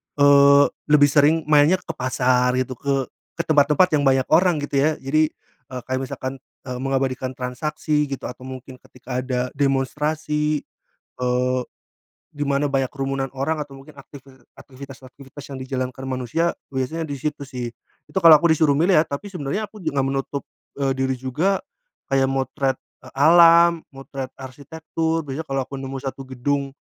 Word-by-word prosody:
eee, 140 0 +6 0.2
lebih 145 -1 +5
sering 155 +2 +4
mainnya 150 +4 +6
ke - - -5
pasar 125 0 +1
gitu, 130 -1 -2
ke 140 -1 0 0.4
ke 170 - -2
tempat-tempat 150 +4 +4
yang 145 - +1
banyak 135 -1 +3
orang 175 -2 +3
gitu 145 -1 -4
ya. 155 - +3
Jadi, 155 +3 +1 0.4
eee, 130 -1 -5
kayak 130 0 -1
misalkan, 130 0 -5 0.3
eee, 125 - -4
mengabadikan 130 0 -1
transaksi 150 +4 -2
gitu 140 -2 -5
atau 125 0 -10
mungkin 130 0 -9
ketika 125 0 -7
ada 125 -1 -1
demonstrasi, 150 +2 0 0.6
eee, 125 0 0 0.7
di 145 - -5
mana 140 0 +1
banyak 135 -2 0
kerumunan 135 -1 -3
orang 150 +3 -1
atau 140 -2 -11
mungkin 145 +3 -15
aktivi 140 -1 -14 0.2
aktivitas-aktivitas 135 +1 -12
yang 130 - -6
dijalankan 130 0 -4
manusia, 130 +7 0 0.2
biasanya 145 +5 -2
di 145 - -5
situ 145 -2 -3
sih. 125 -2 -5 0.4
Itu - - -1
kalo 165 -3 +9
aku 170 - +4
disuruh 155 -2 +3
milih 170 +5 +4
ya, 155 - +3
tapi 160 +7 -6
sebenarnya 185 +5 -4
aku 215 - -13
juga 160 -6 -4
nggak 135 - -1
menutup, 135 +1 -3 0.3
eee, 135 -1 0
diri 130 0 0
juga, 150 +10 -1 0.5
kayak 135 -1 +3
motret, 135 0 -1 0.3
eee, - - -14
alam, 170 +3 +6
motret 135 -1 -7
arsitektur 160 +5 -4
biasanya 150 +2 -6
kalau 135 -1 -1
aku 135 +1 -8
nemu 135 0 -6
1 135 0 -6
gedung, 135 +2 -2
135 Hz, 160 wpm, -22 LUFS, 130-150 Hz, 0.7 s, kalo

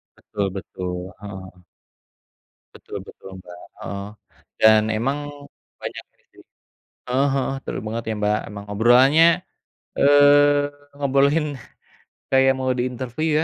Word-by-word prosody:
Betul 100 -1 -4
betul, 90 -1 -6
heeh. 95 -3 -10 1.1
Betul - - -9
betul - - -13
Mbak, 90 0 -12 0.3
heeh, 100 0 -5 0.5
dan 110 0 +6
emang 135 +6 -2 0.5
banyak - - -6
ini - - -37
sih - - -18 0.7
heeh 135 +3 +2
heeh, 135 0 -1
seru - - -4
banget 115 +2 -3
ya, 110 - -1
Mbak. 105 0 +1
Emang 100 0 -9
obrolannya, 125 +9 +5 0.7
eee, 145 0 +5 0.2
ngobrolin 140 +2 +2 0.9
kayak 135 0 +4
mau 130 0 0
di 120 - 0
interview 125 +5 -4
125 Hz, 115 wpm, -22 LUFS, 105-140 Hz, 1.1 s, dan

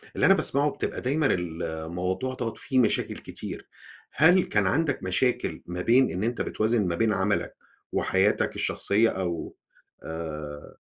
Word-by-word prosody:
اللي - - +2
أنا - - +7
باسمعه 140 +2 +2
بتبقى - - -4
دايمًا 140 +4 +1
الموضوع 90 +6 -3
دوّة 120 -3 -3
فيه 130 - 0
مشاكل 120 - +1
كتير، - - -8 0.4
هل 180 +5 +5
كان 100 -2 +1
عندك 145 - 0
مشاكل 110 +7 0
ما 90 +1 -4
بين 125 +6 +4
إن 90 - -3
أنت 120 +2 -1
بتوازن 110 -2 0
ما 85 - -1
بين 110 +2 +2
عملك 100 +1 0 0.4
وحياتك - - +1
الشخصية، 110 +3 +1
أو 85 -3 -4 0.5
آآ 75 -2 -7
100 Hz, 145 wpm, -26 LUFS, 85-130 Hz, 0.5 s, أنا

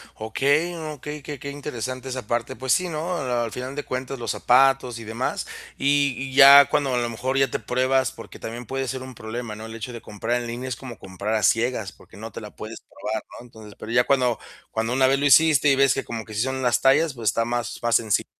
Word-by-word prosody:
Okey, 140 +10 0 0.2
okey, 150 +2 -7
qué 145 -3 -7
qué 140 - -6
interesante 130 -2 -5
esa 125 -4 -5
parte, 120 +2 -2
pues 130 -1 +1
sí, 180 -1 +1
¿no?, 165 +3 -3
al 120 -4 -1
final 130 +3 -6
de 145 - -3
cuentas, 130 +1 -4
los 115 -4 -2
zapatos 125 -1 +3
y - - -8
demás, 115 +4 -3 0.3
y 145 +1 +3
y 135 0 -5
ya 140 0 +10
cuando, 140 -3 +1
a - - +1
lo 120 -1 0
mejor, 130 +4 -2
ya 135 0 +3
te - - -3
pruebas, 130 0 +1
porque 115 - -12
también 120 +2 -7
puede 135 +2 -3
ser 130 +1 -4
un 130 -1 -9
problema, 110 0 -6
¿no?, 110 +1 -8
el 115 0 -8
hecho 115 +2 -6
de 115 - -8
comprar 115 +4 -2
en 120 - -6
línea 120 +2 -5
es 125 - -2
como 125 -2 -9
comprar 100 +4 -4
a 105 - 0
ciegas, 115 -1 +1
porque 95 - -18
no 110 +1 -8
te - - -8
la 105 - -9
puedes 110 +1 -8
probar, 130 0 -5 0.2
¿no?, 120 - -12
entonces, 110 -3 -13
pero 110 - -7
ya 125 +1 +4
cuando 125 -4 +2 0.3
cuando 115 +2 -1
una 130 0 +4
vez 135 +1 +2
lo 145 - 0
hiciste, 150 0 +6
y - - +4
ves 135 -1 +4
que 135 - -3
como 115 -1 -6
que 110 - -11
sí 105 - -1
son 130 +1 -2
las 125 -3 +2
tallas, 140 +3 +4
pues 115 -4 -1
está 115 +3 0
más 120 0 -3
más 120 -1 +2
senci 110 -3 +2
125 Hz, 250 wpm, -24 LUFS, 115-135 Hz, 0.3 s, ya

